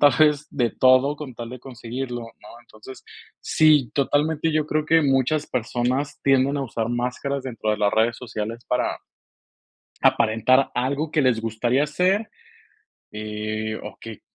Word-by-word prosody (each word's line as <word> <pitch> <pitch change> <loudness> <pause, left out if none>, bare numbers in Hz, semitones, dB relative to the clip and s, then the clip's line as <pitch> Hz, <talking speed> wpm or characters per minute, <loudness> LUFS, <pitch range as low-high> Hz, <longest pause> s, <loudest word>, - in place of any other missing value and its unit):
tal 145 -2 +6
vez, 150 -1 +4
de 120 -5 0
todo 130 +3 +4
con 140 -5 -8
tal 115 0 -7
de 125 - -8
conseguirlo, 125 0 -6 0.2
¿no? - - -14
Entonces, 120 +2 -13 0.4
sí, 150 -6 +3
totalmente 150 +3 +1
yo 155 0 +1
creo 155 0 -1
que 165 0 +4
muchas 140 +2 +1
personas 125 +4 -2
tienden 135 +1 +3
a 140 - -1
usar 115 -3 -3
máscaras 125 +3 -2
dentro 115 -4 -3
de 105 - -1
las 105 -1 +2
redes 115 +1 +2
sociales 115 -1 -6
para 125 - 0 1.1
aparentar 125 +5 +3
algo 140 +5 -1
que 155 - +2
les 125 -4 +2
gustaría 120 +6 0
ser. 185 +8 +1 0.8
Eh, 110 0 -4
o, - - -9
que 115 -2 -9
130 Hz, 150 wpm, -23 LUFS, 115-145 Hz, 1.1 s, tal